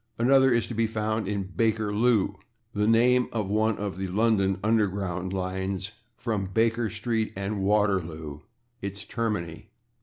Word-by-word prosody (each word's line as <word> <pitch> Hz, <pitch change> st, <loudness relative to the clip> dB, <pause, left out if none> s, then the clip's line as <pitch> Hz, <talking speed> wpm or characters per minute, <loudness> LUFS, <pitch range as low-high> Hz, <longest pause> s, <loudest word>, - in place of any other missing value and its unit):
Another 130 Hz, +2 st, +5 dB
is 120 Hz, -1 st, +2 dB
to -, -, -6 dB
be 115 Hz, 0 st, +1 dB
found 110 Hz, -1 st, -2 dB
in 100 Hz, -2 st, -2 dB
/Bakerloo/, 110 Hz, +2 st, +1 dB, 0.4 s
the 105 Hz, 0 st, +1 dB
name 125 Hz, +2 st, +4 dB
of 105 Hz, -4 st, -2 dB
one 110 Hz, 0 st, +2 dB
of 100 Hz, -2 st, -4 dB
the 95 Hz, -, -2 dB
London 100 Hz, -1 st, +2 dB
underground 95 Hz, -4 st, 0 dB
lines, 95 Hz, +1 st, -3 dB, 0.3 s
from 110 Hz, -5 st, -2 dB
/Baker 115 Hz, +3 st, +1 dB
street/ 110 Hz, 0 st, -1 dB
and 100 Hz, +2 st, -3 dB
/Waterloo/, 90 Hz, -7 st, 0 dB, 0.4 s
its 100 Hz, -1 st, -6 dB
termini. 105 Hz, -9 st, -3 dB
105 Hz, 140 wpm, -27 LUFS, 95-115 Hz, 0.4 s, Another